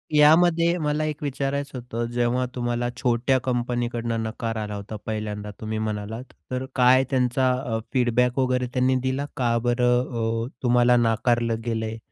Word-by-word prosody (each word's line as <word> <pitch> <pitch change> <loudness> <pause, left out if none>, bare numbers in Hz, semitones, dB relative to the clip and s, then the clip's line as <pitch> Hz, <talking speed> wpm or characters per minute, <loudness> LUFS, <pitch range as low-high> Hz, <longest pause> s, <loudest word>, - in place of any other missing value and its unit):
यामध्ये 170 +3 +5
मला 150 +1 0
एक 150 -1 -4
विचारायचं 140 0 -2
होतं, 120 -1 -4
जेव्हा 120 +1 +1
तुम्हाला 120 0 -1
छोट्या 125 +2 +2
कंपनी 120 -1 0
कडनं 115 -1 -2
नकार 115 +1 -4
आला 105 -1 -4
होता 100 +2 -7
पहिल्यांदा 105 -1 -4
तुम्ही 110 0 -3
म्हणालात, 110 +2 -4 0.3
तर 130 +1 -2
काय 130 +1 +5
त्यांचा 130 0 +2 0.2
अ, 110 -2 -1
फीडबॅक 125 0 +2
वगैरे 125 -1 +1
त्यांनी 130 0 +2
दिला, 130 +2 -1
"का 120 -3 +1
बरं 120 -2 +1
अ, - - -6 0.2
तुम्हाला 125 0 +4
नाकारलं 115 0 +1
गेलंय?" 110 -1 -2
120 Hz, 150 wpm, -24 LUFS, 115-130 Hz, 0.3 s, यामध्ये